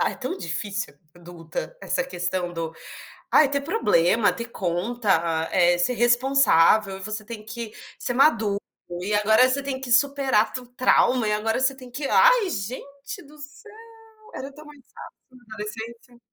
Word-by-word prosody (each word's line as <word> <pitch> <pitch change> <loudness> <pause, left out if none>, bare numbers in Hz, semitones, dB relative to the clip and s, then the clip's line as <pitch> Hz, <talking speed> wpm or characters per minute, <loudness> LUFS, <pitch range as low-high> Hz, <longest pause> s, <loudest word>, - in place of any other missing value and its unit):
ah, - - +2
é - - -9
tão 255 -6 -4
difícil 190 +2 -4 0.2
adulta 175 - -8
essa - - -1
questão 180 -5 -3
do 165 -1 -5 0.6
ai, 295 -3 +5
ter 280 0 0
problema, 225 - +2
ter 235 - -6
conta, 175 -5 -1
eh, 175 -1 +4
ser 175 +8 +1
responsável 240 -6 +3
e - - -14
você 215 +2 -5
tem 215 -1 -9
que 225 0 -7 0.3
ser 245 - -3
maduro, 225 -7 +3 0.4
e 205 +3 -3
agora 220 +4 +5
você 275 +2 -1
tem 270 -1 -4
que 250 -2 -3
superar 270 -4 +3
tu 255 - -6
trauma 250 -2 +3
e - - +1
agora 220 +3 0
você 265 +1 +2
tem 255 -2 -12
que 275 +3 -4
ai, - - +5
gente 280 - -7
do 300 +2 -17
céu, 300 +9 -12 0.6
era 270 +1 -6
tão 300 +2 -14
mais 295 -2 -14
fácil - - -10 0.3
na 245 - -19
adolescência. 230 +3 -8
235 Hz, 165 wpm, -24 LUFS, 200-270 Hz, 0.6 s, ai